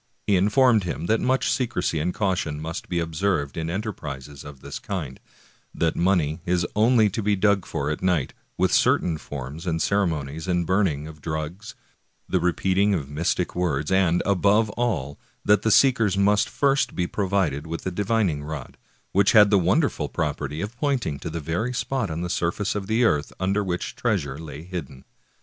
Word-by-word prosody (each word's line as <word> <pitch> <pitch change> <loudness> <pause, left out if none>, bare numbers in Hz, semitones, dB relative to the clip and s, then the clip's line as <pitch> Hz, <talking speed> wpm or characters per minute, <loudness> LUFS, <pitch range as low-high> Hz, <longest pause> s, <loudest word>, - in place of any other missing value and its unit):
He 100 - +3
informed 105 +3 +4
him 85 -1 -4
that 110 +5 +1
much 130 +1 +1
secrecy 100 - -1
and 85 +4 0
caution 90 -7 -1
must 80 +2 -6
be 85 - -1
observed 80 -3 -1
in 80 0 -3
enterprises 75 - -5
of 70 -2 -11
the - - -8
kind; 80 -10 -5 0.6
that 80 -1 0
money 85 -4 +1
is 90 0 +1
only 110 +1 +4
to 110 - -2
be 105 0 +2
dug 100 -1 +2
for 70 +1 -2
at 75 - -4
night, 90 -7 +1 0.2
with - - +2
cer - - +5
tain 80 -3 -3
forms 75 +5 -7
and 80 -1 0
ceremonies 80 -5 -1
and 90 -1 +1
burning 80 -5 +1
of 75 -1 -12
drugs, 80 +7 -5 0.5
the - - +1
repeat 95 +2 +1
ing 100 0 +4
of 70 -5 -4
mystic 85 +4 -1
words, 75 -4 -1
and, 90 -2 +3
above 100 +3 +3
all, 100 - -2 0.3
that 105 -1 +4
the 110 - +1
seekers 115 -4 +4
must 100 +1 +3
first 140 -1 +1
be 90 - 0
provided 90 -7 -1
with 80 +1 -5
a 95 - -1
divining 100 -6 0
rod,^ 75 -4 -6 0.4
which 100 +1 +3
had 105 -2 +7
the 100 - +5
won 95 - +3
derful 80 - -2
property 75 -1 -3
of 105 +4 -5
pointing 125 - -1
to 80 - -5
the 85 +1 -4
very 85 - -2
spot 130 -5 -1
on 80 +1 -4
the 90 - -2
surface 90 +3 -1
of 100 -2 -4
the 110 +3 +2
earth 75 -10 +1
under 100 +2 +1
which 90 -2 -3
treasure 80 - -1
lay 75 -2 -8
hidden. 75 -7 -7
90 Hz, 185 wpm, -24 LUFS, 80-105 Hz, 0.6 s, had